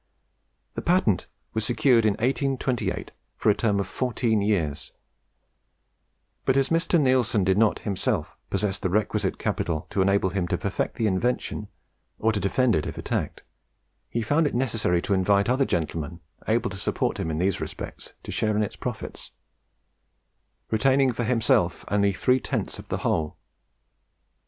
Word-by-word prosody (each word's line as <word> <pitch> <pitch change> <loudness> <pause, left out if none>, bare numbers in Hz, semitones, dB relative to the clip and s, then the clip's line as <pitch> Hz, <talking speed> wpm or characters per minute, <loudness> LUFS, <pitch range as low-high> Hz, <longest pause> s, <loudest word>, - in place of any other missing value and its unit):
The - - -4
patent 170 - +2 0.3
was 110 - -1
secured 120 -1 +3
in 105 - +3
1828 130 +1 -1 0.3
for - - +4
a - - +1
term 105 -3 +1
of 100 - 0
fourteen 115 0 0
years; 85 -9 -1 1.5
but, 130 - +2
as 135 0 +2
Mr. 165 +1 +2
Neilson 130 -7 +3
did 95 0 +3
not 110 -2 +4
himself 100 -4 -1
possess 100 -2 -1
the 95 - -1
requisite 105 +4 0
capital 80 -3 -2
to 100 - +1
enable 100 -1 +2
him 95 -2 -1
to - - 0
perfect - - -2
the 115 - 0
invention, 105 +1 -1 0.5
or 110 - +2
to 105 - -1
defend 115 +5 +2
it 75 - -1
if - - -6
attacked, - - -3 0.7
he 115 - -1
found 145 +7 +2
it 140 - -3
necessary 110 -9 +1
to 100 - 0
invite 100 +1 +3
other 130 +3 +2
gentlemen, 85 - -2 0.3
able - - +1
to - - -6
support - - -1
him 80 - -2
in 80 - -2
these 95 +2 0
respects, - - -7
to - - -6
share 110 -1 0
its 105 -2 -1
profits; - - -6 1.4
retaining 130 +4 +3
for 115 +1 -2
himself 115 -1 +2
only 100 0 +3
three 125 +7 +2
tenths - - -3
of - - -10
the - - -2
whole. 75 -2 0
110 Hz, 155 wpm, -25 LUFS, 95-125 Hz, 1.5 s, for